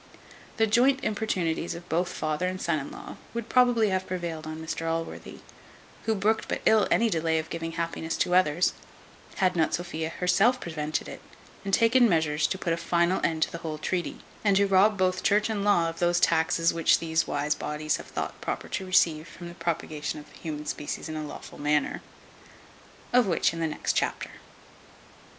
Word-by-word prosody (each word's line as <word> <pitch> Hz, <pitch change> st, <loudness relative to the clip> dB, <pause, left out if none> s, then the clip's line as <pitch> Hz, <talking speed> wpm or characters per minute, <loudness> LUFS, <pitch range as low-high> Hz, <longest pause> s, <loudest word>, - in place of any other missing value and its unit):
The 225 Hz, -, +4 dB
joint 260 Hz, +5 st, +3 dB
importunities 180 Hz, -6 st, -1 dB
of 175 Hz, +1 st, -10 dB
both 175 Hz, +2 st, 0 dB
father 155 Hz, +3 st, -1 dB
and 185 Hz, 0 st, -3 dB
son 170 Hz, -4 st, 0 dB
in 135 Hz, -, -6 dB
law -, -, -9 dB, 0.2 s
would 235 Hz, -1 st, -4 dB
probably 245 Hz, -4 st, +4 dB
have 190 Hz, 0 st, -1 dB
prevailed 170 Hz, -4 st, -4 dB
on 155 Hz, 0 st, -5 dB
Mr 160 Hz, 0 st, -4 dB
Allworthy, 165 Hz, 0 st, -5 dB, 0.6 s
who 220 Hz, -, +1 dB
brooked 215 Hz, +3 st, +1 dB
but -, -, -3 dB
ill 220 Hz, -1 st, +5 dB
any 230 Hz, -, +3 dB
delay 165 Hz, -5 st, +1 dB
of 160 Hz, 0 st, -4 dB
giving 165 Hz, 0 st, -4 dB
happiness 165 Hz, -1 st, -3 dB
to 180 Hz, -, 0 dB
others, 180 Hz, -1 st, +3 dB, 0.6 s
had 185 Hz, -1 st, +2 dB
not 160 Hz, -2 st, +2 dB
Sophia 160 Hz, -1 st, -4 dB
herself 185 Hz, +9 st, +2 dB
prevented 155 Hz, -4 st, -3 dB
it, -, -, -9 dB, 0.4 s
and 195 Hz, -, -3 dB
taken 230 Hz, +3 st, +5 dB
measures 155 Hz, -3 st, +2 dB
to -, -, -2 dB
put 170 Hz, -2 st, -1 dB
a -, -, -1 dB
final 170 Hz, +2 st, +1 dB
end 160 Hz, -1 st, +1 dB
to -, -, -2 dB
the 170 Hz, -, -6 dB
whole 160 Hz, -2 st, -5 dB
treaty, 175 Hz, +3 st, -3 dB, 0.2 s
and 200 Hz, -2 st, +4 dB
to 200 Hz, -, +4 dB
rob 195 Hz, +2 st, +4 dB
both 185 Hz, -1 st, +1 dB
church 210 Hz, +2 st, +2 dB
and 205 Hz, -2 st, -2 dB
law 190 Hz, -5 st, +3 dB
of 165 Hz, 0 st, -5 dB
those 175 Hz, 0 st, +2 dB
taxes 165 Hz, 0 st, +2 dB
which 165 Hz, -1 st, +4 dB
these 160 Hz, -1 st, 0 dB
wise 145 Hz, +1 st, 0 dB
bodies 150 Hz, 0 st, -2 dB
have -, -, -10 dB
thought -, -, -5 dB
proper -, -, -4 dB
to 190 Hz, -, -4 dB
receive 165 Hz, -3 st, +3 dB
from 170 Hz, +1 st, -10 dB
the -, -, -9 dB
propagation 155 Hz, -3 st, -3 dB
of 150 Hz, -, -13 dB
the -, -, -15 dB
human 150 Hz, -2 st, -5 dB
species 150 Hz, +1 st, -4 dB
in 155 Hz, -, -5 dB
a 155 Hz, -, -3 dB
lawful 150 Hz, -, -9 dB
manner. 150 Hz, 0 st, +1 dB, 1.1 s
Of 250 Hz, -3 st, +5 dB
which 170 Hz, -2 st, +2 dB
in 165 Hz, -, -5 dB
the 165 Hz, -, 0 dB
next 150 Hz, -, -2 dB
chapter. -, -, -1 dB
170 Hz, 195 wpm, -27 LUFS, 160-195 Hz, 1.1 s, ill